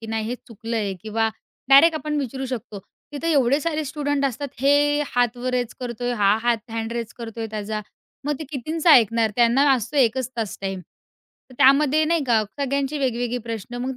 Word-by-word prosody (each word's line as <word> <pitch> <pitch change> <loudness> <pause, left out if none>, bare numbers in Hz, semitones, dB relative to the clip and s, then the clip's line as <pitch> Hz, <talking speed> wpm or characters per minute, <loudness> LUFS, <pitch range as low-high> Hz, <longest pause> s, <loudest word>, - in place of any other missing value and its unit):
की 225 - -9
नाही 220 -1 -2
हे 245 - -2
चुकलं 230 +1 -5
आहे 205 -3 -1
किंवा 225 +1 0 0.4
डायरेक्ट 290 +5 +7
आपण 305 -1 -3
विचारू 265 0 -4
शकतो. 235 -5 -6 0.3
तिथे 330 +3 -2
एवढे 275 -1 +3
सारे 310 0 -2
स्टुडंट 290 -1 -1
असतात. 275 +2 -2
हे 290 +2 +3
हात 245 -1 0
वर 250 +1 -3
रेज 245 -2 -1
करतोय, 245 0 -3
हा 205 -2 +3
हात 235 -1 -1
हँड 225 0 -3
रेज 235 -1 -4
करतोय 225 -1 -5
त्याचा, 215 0 -4 0.4
मग 295 - 0
ते 315 - -6
कितींचा 310 +4 0
ऐकणार? 230 -3 +5
त्यांना 245 +4 +4
असतो 255 +3 -2
1च 255 -1 +2
तास 220 -4 -3
टाईम. 195 -1 -4 0.7
तर - - -13
त्यामध्ये 295 +3 +5
नाही 330 0 +1
का 230 -3 +3 0.2
सगळ्यांची 280 +1 -1
वेगवेगळी 245 -2 -1
प्रश्न 230 0 -6
मग 260 0 -3
245 Hz, 185 wpm, -23 LUFS, 225-280 Hz, 0.7 s, डायरेक्ट